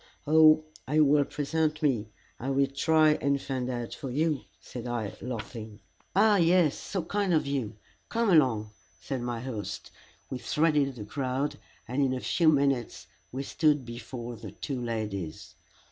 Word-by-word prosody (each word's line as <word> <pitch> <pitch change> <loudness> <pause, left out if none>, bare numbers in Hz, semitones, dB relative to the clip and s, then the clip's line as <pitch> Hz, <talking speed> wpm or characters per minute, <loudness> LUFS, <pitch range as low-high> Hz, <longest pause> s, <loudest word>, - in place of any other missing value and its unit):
"Oh, 155 0 +6 0.2
if 150 - -1
you 155 -1 +6
will 145 0 +4
present 155 +1 -1
me, 115 -7 +1 0.3
I 130 - -3
will 135 0 +3
try 155 +3 +3
and 140 0 +2
find 130 -2 -3
out 120 -2 -4
for 135 - -6
you," 150 +2 0
said 125 -1 -8
I, 115 -4 -3
laughing. 110 -3 -6 0.4
"Ah, 210 +1 +5
yes 170 -3 +4
so 190 -4 -4
kind 195 0 0
of 155 - +2
you 135 -7 -2 0.3
come 230 -3 +1
along," 120 -10 +3 0.3
said 135 -3 -4
my 120 -1 -3
host. 115 -5 -5 0.4
We 130 - -3
threaded 150 -2 +1
the 105 -4 -7
crowd, 135 +4 -2 0.3
and 130 +4 -1
in 130 -2 +2
a - - -3
few 165 +4 +3
minutes 140 -5 +1 0.3
we 135 +2 -3
stood 150 -2 +2
before 120 0 -7
the 110 -1 -8
two 125 +6 -5
ladies. 105 -8 -4
135 Hz, 160 wpm, -28 LUFS, 120-155 Hz, 0.4 s, Oh